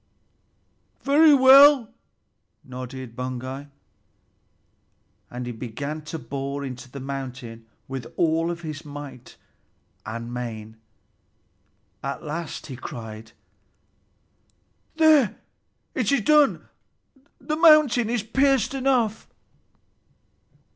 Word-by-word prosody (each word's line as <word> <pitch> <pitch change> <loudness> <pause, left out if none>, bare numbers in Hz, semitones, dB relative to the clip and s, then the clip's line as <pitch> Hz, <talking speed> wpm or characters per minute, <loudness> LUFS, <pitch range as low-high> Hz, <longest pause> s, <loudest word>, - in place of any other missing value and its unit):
"Very 295 +2 +6
well," 270 -2 +7 0.7
nodded 130 -1 -8
Baugi, 130 +2 -5 1.6
and 125 0 -6
he 120 - -4
began 130 +6 -6
to 160 - -5
bore 140 -1 -5
into 130 0 -8
the 140 - -9
mountain 130 -4 -7 0.2
with 130 -3 -7
all 165 0 +1
his 160 -2 -8
might 145 -4 -10 0.7
and 115 +2 -6
main. 110 -3 -6 1.2
At 140 +4 -5
last 160 +1 -5
he 135 - -8
cried, 110 -3 -9 1.6
"There, 310 -8 +4 0.6
it - - 0
is 280 -4 +2
done; 300 +5 +3 0.7
the 305 - -3
mountain 305 -8 +5
is 235 -3 -1
pierced 270 +3 +2
through!" 260 -5 +1
145 Hz, 90 wpm, -24 LUFS, -, 1.6 s, well